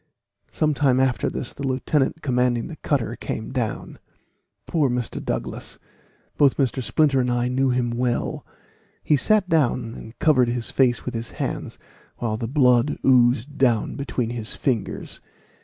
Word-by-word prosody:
Some 155 -1 0
time 135 -2 +2
after 130 -2 +1
this 125 - -5
the - - -10
lieutenant 135 +3 0
commanding 125 -3 +1
the 165 - -7
cutter 120 -5 -1
came 110 -1 -5
down. 120 -4 -3 0.7
Poor 150 -5 +1
Mr. 125 -1 -3
Douglas! - - -4 0.6
both 140 -2 +4
Mr. 135 -1 0
Splinter 140 +1 +2
and 125 -1 +1
I 120 0 0
knew 130 +1 +1
him 125 -1 0
well. 120 0 -1 0.6
He 150 - +3
sat 205 +7 +2
down 130 -8 +1
and 110 0 -11
covered 130 -6 +4
his 120 0 -2
face 125 -3 +2
with - - -4
his 115 0 -4
hands, - - -4 0.4
while 115 -3 -2
the 115 +1 -4
blood 125 0 +3
oozed 130 +2 +3
down 120 -5 +2
between 125 -4 -2
his 115 -2 -3
fingers. 120 -8 -3
125 Hz, 155 wpm, -23 LUFS, 120-140 Hz, 0.7 s, both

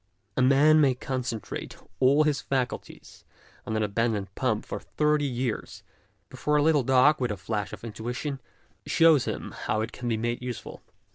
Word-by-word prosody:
A - - +1
man 145 +4 +5
may 135 -3 +4
concentrate 125 -3 -5 0.2
all 140 +4 +5
his 150 -3 0
faculties 130 -3 -4 0.4
on 110 - -2
an 110 - +1
abandoned 105 -2 -1
pump 110 -3 -1
for - - -5
thirty 150 -1 0
years, 125 -3 -4 0.4
before 150 - -1
a 145 - +4
little 155 -2 +4
dog, 130 +3 +4
with 125 - +1
a 105 - -3
flash 105 +1 -3
of - - -9
TRAITORS 115 -2 -8
OF 110 - -7
ART 125 - -2
85 150 - -4
intuition, 140 -2 -4 0.5
shows 165 -5 +5
him - - -4
how 110 - -2
it 110 +2 -3
can 125 - -6
be 115 - 0
made 120 +2 -2
useful. 125 -2 -7
125 Hz, 190 wpm, -27 LUFS, 115-145 Hz, 0.5 s, man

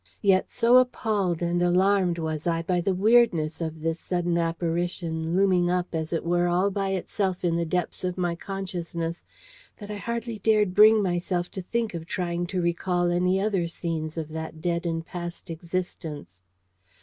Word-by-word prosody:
Yet 195 -2 +3
so 240 +1 +4
appalled 210 -8 +1
and 175 0 0
alarmed 180 0 +3
was 160 -1 -3
I 165 -1 0
by 175 +1 0
the 190 +2 0
weirdness 190 -7 +3
of 160 -1 -4
this 165 +1 -1
sudden 175 -1 -1
apparition, 170 0 -1
looming 185 -2 +3
up, 180 0 -1
as 160 -1 -2
it 165 -1 -2
were, 175 +1 +2
all 180 +3 +2
by 195 0 -1
itself 190 -1 -2
in 170 -1 +2
the 170 0 -1
depths 180 +3 -2
of 180 0 -2
my 175 -2 0
consciousness, 170 -2 -4 0.5
that 205 -1 -8
I 210 - -4
hardly 235 +1 -4
dared 210 -3 +3
bring 215 +1 +7
myself 175 -1 -1
to 190 - -5
think 230 +4 -2
of 165 -1 -6
trying 175 -1 -2
to 180 -1 -2
recall 175 +1 0
any 180 +2 +2
other 195 -4 0
scenes 165 -2 -4
of 160 -2 -3
that 160 0 -6
dead 170 +1 -1
and 165 -1 -2
past 175 -1 -7
existence. 160 - -5
175 Hz, 175 wpm, -26 LUFS, 170-190 Hz, 0.5 s, bring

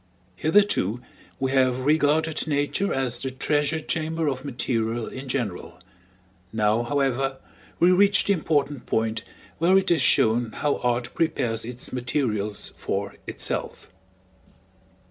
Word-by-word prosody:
Hitherto 155 - +2 0.4
we 135 0 0
have 130 -2 +3
regarded 155 +2 +2
Nature 145 +7 0
as 130 -3 -1
the 135 - -2
treasure 145 +4 0
chamber 160 0 -2
of 135 -2 -2
material 120 -4 -1
in 130 +1 -8
general; 120 -9 -3 0.7
now, 110 +1 +2
however, 135 0 0 0.4
we 175 +2 +6
reach 200 +2 +4
the 200 - +3
important 145 -6 -1
point 110 0 0 0.4
where 180 +4 +5
it 190 -2 +2
is 170 - +3
shown 115 0 +3
how 145 -1 0
Art 120 0 -1
prepares 125 -9 0
its 125 +2 -7
materials 120 -5 -2
for - - -3
itself. - - -4
135 Hz, 125 wpm, -25 LUFS, 120-155 Hz, 0.7 s, we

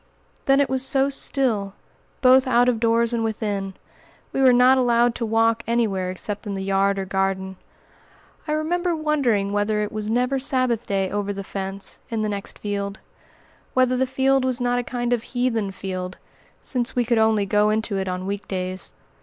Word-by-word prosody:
Then 275 0 +4
it 280 - +3
was 260 0 0
so 270 +1 +2
still, 235 -8 0 0.5
both 260 0 +6
out 245 -1 +4
of 240 -3 +2
doors 230 +1 +2
and 230 -1 0
within! 205 -3 -3 0.6
We 270 - 0
were 260 -1 +7
not 250 +2 +5
allowed 240 -1 +3
to 230 -1 -3
walk 225 +1 +2
anywhere 210 -6 0
except 205 +3 -5
in 200 - -3
the 190 - -4
yard 195 +1 +1
or 195 - -2
garden. 190 0 -1 0.9
I 300 - 0
remember 345 +3 0
wondering 270 -11 +1
whether 205 +1 0
it 210 - -4
was 215 0 -4
never 250 +4 +1
Sabbath 255 -3 0
day 195 -1 0
over 205 0 -2
the 200 0 -5
fence, 195 0 -4
in 225 -2 -2
the 215 - -1
next 200 -1 -5
field; 200 -1 -3 0.8
whether 255 0 +3
the 260 +1 +1
field 265 +1 +2
was 255 -1 0
not 245 0 +1
a - - -2
kind 240 0 -2
of 240 - 0
heathen 240 -4 -1
field, 185 -1 -5 0.5
since 245 -3 -2
we 245 -1 +1
could 235 -1 +2
only 220 -2 +3
go 210 +1 +2
into 215 -2 0
it 190 - -3
on 185 0 -3
week 200 +1 -4
days. 185 0 -4
225 Hz, 185 wpm, -23 LUFS, 200-255 Hz, 0.9 s, were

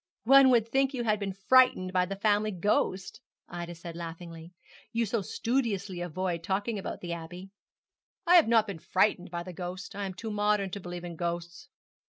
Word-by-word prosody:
'One 270 +2 +7
would 235 -3 +3
think 270 +3 +1
you 240 - -2
had 215 -2 +1
been 195 -2 -4
frightened 255 -8 +5
by 180 -1 +2
the 195 - -4
family 210 +1 +1
ghost,' 190 0 -1 0.3
Ida 175 0 -6
said 170 0 -9
laughingly, 165 0 -8 0.4
'you 230 0 0
so 220 +1 -1
studiously 205 -5 -2
avoid 175 0 -3
talking 205 +4 -1
about - - -6
the 175 -1 -4
Abbey.' 175 +3 -8 0.7
'I 350 - +6
have 330 - +5
not 225 -2 +4
been 200 -6 -6
frightened 185 +1 +1
by 170 0 -4
the 180 0 -9
ghost 180 +3 -6
I 200 -1 -3
am 185 - -7
too 220 +3 -6
modern 210 -2 +1
to 200 - -5
believe 175 -1 -7
in 170 -2 -7
ghosts.' 170 0 -5
190 Hz, 190 wpm, -29 LUFS, 175-215 Hz, 0.7 s, One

